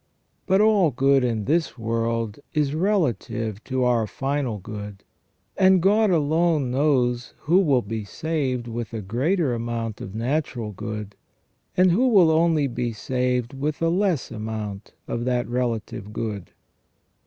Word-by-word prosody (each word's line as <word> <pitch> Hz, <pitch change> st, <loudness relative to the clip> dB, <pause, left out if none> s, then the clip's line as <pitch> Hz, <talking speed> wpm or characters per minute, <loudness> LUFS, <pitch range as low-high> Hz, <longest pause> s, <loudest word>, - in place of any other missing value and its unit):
But 190 Hz, +2 st, +4 dB
all 210 Hz, -6 st, +4 dB
good 135 Hz, +1 st, +3 dB
in 115 Hz, -4 st, -1 dB
this 160 Hz, -1 st, 0 dB
world 115 Hz, -1 st, -2 dB, 0.2 s
is 145 Hz, -2 st, +1 dB
relative 120 Hz, -, -1 dB
to 130 Hz, -1 st, -1 dB
our 120 Hz, -3 st, +2 dB
final 135 Hz, -2 st, -2 dB
good, 105 Hz, 0 st, -8 dB, 0.5 s
and 190 Hz, -1 st, +5 dB
God 210 Hz, +4 st, +3 dB
alone 160 Hz, -4 st, +2 dB
knows 125 Hz, -3 st, +1 dB
who 170 Hz, +5 st, +4 dB
will 140 Hz, -10 st, +3 dB
be 110 Hz, +2 st, -4 dB
saved 130 Hz, 0 st, -2 dB
with 115 Hz, 0 st, -5 dB
a 110 Hz, -, -3 dB
greater 135 Hz, -, 0 dB
amount 115 Hz, -2 st, -3 dB
of 95 Hz, -, -7 dB
natural 120 Hz, -2 st, -2 dB
good, 105 Hz, +1 st, -6 dB, 0.6 s
and 185 Hz, 0 st, +5 dB
who 240 Hz, +9 st, +3 dB
will 190 Hz, -9 st, +6 dB
only 160 Hz, -2 st, +3 dB
be 120 Hz, -2 st, -2 dB
saved 125 Hz, +2 st, -1 dB
with 145 Hz, +2 st, -3 dB
a 165 Hz, -, +2 dB
less 180 Hz, -4 st, 0 dB
amount 110 Hz, -2 st, -5 dB
of 120 Hz, -, -3 dB
that 125 Hz, -1 st, 0 dB
relative 115 Hz, -4 st, -3 dB
good. 105 Hz, -4 st, -4 dB
125 Hz, 140 wpm, -24 LUFS, 115-160 Hz, 0.6 s, will